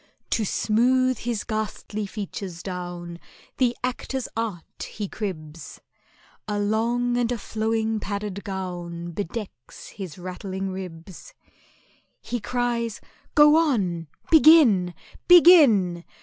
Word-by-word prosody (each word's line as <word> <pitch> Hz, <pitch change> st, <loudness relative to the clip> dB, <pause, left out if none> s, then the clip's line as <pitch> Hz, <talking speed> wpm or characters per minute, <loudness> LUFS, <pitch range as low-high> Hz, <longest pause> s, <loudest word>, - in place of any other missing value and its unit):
To 225 Hz, -, +1 dB
smooth 250 Hz, +5 st, +2 dB
his 235 Hz, -3 st, -3 dB
ghastly 215 Hz, -1 st, -4 dB
features 195 Hz, -4 st, -6 dB
down 175 Hz, -2 st, -6 dB, 0.4 s
The 245 Hz, -2 st, +1 dB
actor's 255 Hz, 0 st, -3 dB
art 220 Hz, -7 st, -5 dB
he 210 Hz, -2 st, -5 dB
cribs,— 165 Hz, -7 st, -7 dB, 0.7 s
A 210 Hz, -1 st, -2 dB
long 235 Hz, +4 st, 0 dB
and 245 Hz, -1 st, 0 dB
a 245 Hz, -, -1 dB
flowing 220 Hz, 0 st, -1 dB
padded 200 Hz, -1 st, -5 dB
gown. 175 Hz, -3 st, -5 dB
Bedecks 195 Hz, -, -7 dB
his 190 Hz, -6 st, -8 dB
rattling 190 Hz, +1 st, -5 dB
ribs. 185 Hz, -2 st, -9 dB, 0.8 s
He 240 Hz, -, -4 dB
cries, 240 Hz, -1 st, -2 dB, 0.4 s
"Go 295 Hz, 0 st, +7 dB
on—begin, 215 Hz, -, +4 dB, 0.3 s
begin! 275 Hz, -, +7 dB
210 Hz, 100 wpm, -24 LUFS, 180-240 Hz, 0.8 s, Go